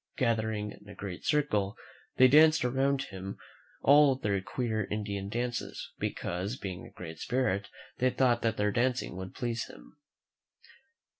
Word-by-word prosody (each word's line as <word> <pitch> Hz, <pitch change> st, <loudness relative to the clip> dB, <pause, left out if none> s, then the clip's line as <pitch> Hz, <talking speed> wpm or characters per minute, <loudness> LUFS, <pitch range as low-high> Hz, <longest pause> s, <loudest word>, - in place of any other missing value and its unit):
Gathering 110 Hz, -5 st, 0 dB
in 100 Hz, 0 st, -14 dB
a 100 Hz, -, -10 dB
great 95 Hz, -3 st, -7 dB
circle, 105 Hz, -10 st, +1 dB, 0.4 s
they 130 Hz, -, +8 dB
danced 155 Hz, +1 st, +6 dB
around 135 Hz, +2 st, +1 dB
him 95 Hz, 0 st, -7 dB, 0.5 s
all 145 Hz, -1 st, +7 dB
their 100 Hz, -6 st, -1 dB
queer 110 Hz, 0 st, -2 dB
Indian 100 Hz, -2 st, -3 dB
dances, 120 Hz, +2 st, -3 dB
because, 95 Hz, +6 st, -2 dB
being 95 Hz, -6 st, -6 dB
a -, -, -20 dB
great 80 Hz, -2 st, -8 dB
spirit, 115 Hz, -6 st, 0 dB, 0.3 s
they 130 Hz, -, +4 dB
thought 125 Hz, -2 st, +2 dB
that 115 Hz, -2 st, 0 dB
their 105 Hz, 0 st, +2 dB
dancing 125 Hz, -2 st, 0 dB
would 95 Hz, 0 st, -7 dB
please 120 Hz, -2 st, -2 dB
him. 150 Hz, -, -15 dB
110 Hz, 145 wpm, -30 LUFS, 100-130 Hz, 0.5 s, they